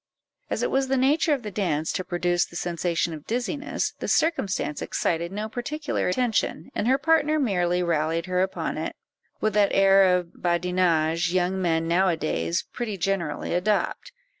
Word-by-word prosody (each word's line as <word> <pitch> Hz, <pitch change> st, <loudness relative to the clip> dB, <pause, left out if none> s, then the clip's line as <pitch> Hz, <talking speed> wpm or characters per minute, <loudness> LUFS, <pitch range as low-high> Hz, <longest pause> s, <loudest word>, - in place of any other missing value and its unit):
As -, -, -1 dB
it -, -, 0 dB
was 270 Hz, 0 st, +1 dB
the 270 Hz, 0 st, +1 dB
nature 290 Hz, +5 st, +3 dB
of 275 Hz, -4 st, +1 dB
the 210 Hz, -, -5 dB
dance 165 Hz, -6 st, -1 dB
to 185 Hz, -, -2 dB
produce 175 Hz, 0 st, 0 dB
the -, -, -10 dB
sensation 170 Hz, -1 st, -1 dB
of 155 Hz, -1 st, -10 dB
dizziness, 250 Hz, +6 st, -2 dB
this -, -, +1 dB
circumstance 205 Hz, -, 0 dB
excited 170 Hz, +1 st, -1 dB
no 210 Hz, +2 st, -3 dB
particular 290 Hz, +7 st, -3 dB
attention, 215 Hz, -5 st, -1 dB
and 220 Hz, -, -1 dB
her 260 Hz, +2 st, +4 dB
partner 310 Hz, 0 st, +2 dB
merely 180 Hz, -8 st, +1 dB
rallied 165 Hz, 0 st, 0 dB
her 180 Hz, 0 st, 0 dB
upon 190 Hz, 0 st, -2 dB
it, -, -, -4 dB, 0.5 s
with 215 Hz, -1 st, +1 dB
that 205 Hz, -1 st, +3 dB
air 195 Hz, -1 st, +5 dB
of 175 Hz, -1 st, -8 dB
badinage 170 Hz, -2 st, +1 dB
young 185 Hz, +1 st, 0 dB
men 165 Hz, -2 st, +1 dB
now 180 Hz, +3 st, +3 dB
a 170 Hz, -3 st, +1 dB
days 165 Hz, +3 st, -1 dB
pretty 220 Hz, -5 st, -3 dB
generally 180 Hz, -5 st, -2 dB
adopt. 205 Hz, -, 0 dB
185 Hz, 170 wpm, -25 LUFS, 170-220 Hz, 0.5 s, air